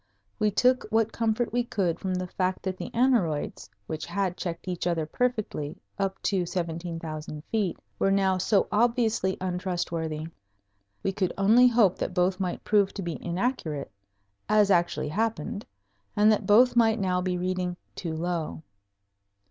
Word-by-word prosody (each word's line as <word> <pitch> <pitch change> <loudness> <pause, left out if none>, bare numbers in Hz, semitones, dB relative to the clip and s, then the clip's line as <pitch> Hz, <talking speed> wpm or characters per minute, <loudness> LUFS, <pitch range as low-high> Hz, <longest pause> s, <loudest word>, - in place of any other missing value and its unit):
We 215 -1 +3
took 250 +5 +3
what 225 0 +2
comfort 230 0 0
we 245 0 +2
could 190 -8 -1
from 185 -1 -2
the 185 0 -2
fact 185 +1 -2
that 190 -1 -2
the - - -6
aneroids, 195 - +1 0.2
which 155 +6 -5
had 195 -3 -1
checked 170 -1 -5
each 180 -1 -2
other 165 -3 0
perfectly 215 -7 -2 0.2
up 195 -1 -1
to 190 -3 +1
17,000 165 -3 -4
feet, 205 -6 0 0.2
were 195 - +3
now 190 -1 +2
so 195 +2 +2
obviously 225 -4 +2
untrustworthy. 175 -4 -2 0.8
We 195 - +1
could 190 -2 -1
only 220 +6 +6
hope 225 -6 +3
that 180 - -3
both 185 +1 +2
might 180 -2 -2
prove 205 -2 +2
to 195 - -4
be 170 -2 -5
inaccurate, 175 - -2 0.6
as 210 -1 +4
actually 175 -4 +2
happened, 220 +3 -2 0.5
and 210 +1 +5
that 215 - 0
both 240 +4 +6
might 225 -1 +4
now 180 -2 +1
be 180 0 -1
reading 180 0 -2 0.2
too 165 -3 -4
low. 160 - -3
185 Hz, 155 wpm, -27 LUFS, 175-215 Hz, 0.8 s, only